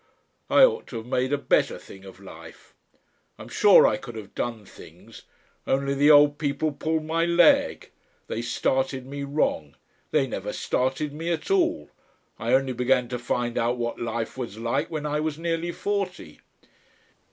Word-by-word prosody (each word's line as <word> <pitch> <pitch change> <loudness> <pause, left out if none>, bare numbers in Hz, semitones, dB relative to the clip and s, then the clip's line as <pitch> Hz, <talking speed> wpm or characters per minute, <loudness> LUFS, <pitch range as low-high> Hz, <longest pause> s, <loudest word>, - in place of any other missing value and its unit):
I - - +6
ought 470 -2 +3
to 120 - -7
have 110 - -7
made 125 +1 -1
a 145 - +2
better - - +1
thing 95 0 -14
of 95 -1 -13
life. 85 -4 -13 0.6
"I'm - - -11
sure - - +6
I 105 - +2
could 120 0 -10
have 105 -3 -9
done 115 -3 -4
things. - - -15 0.5
Only 140 +1 0
the 145 +2 +3
old 145 -1 +6
people 150 +1 -1
pulled 155 +2 -2
my 165 +1 0
leg. 170 -1 +3 0.3
They 115 - -4
started 130 +2 -1
me 140 +1 -6
wrong. 140 - -1 0.3
They - - +2
never - - -5
started 135 +3 -1
me 165 +3 -3
at 170 - -3
all. 345 -4 +1 0.5
I - - -2
only 130 -1 +2
began 125 0 +1
to 125 -1 -4
find 120 0 -2
out 120 +2 0
what 120 -1 -4
life 115 +1 -4
was 115 -4 -5
like 115 +1 -1
when 155 -2 -4
I 150 0 -1
was 155 -1 -2
nearly 165 +1 -2
forty. 185 - -4
135 Hz, 170 wpm, -25 LUFS, 120-155 Hz, 0.6 s, I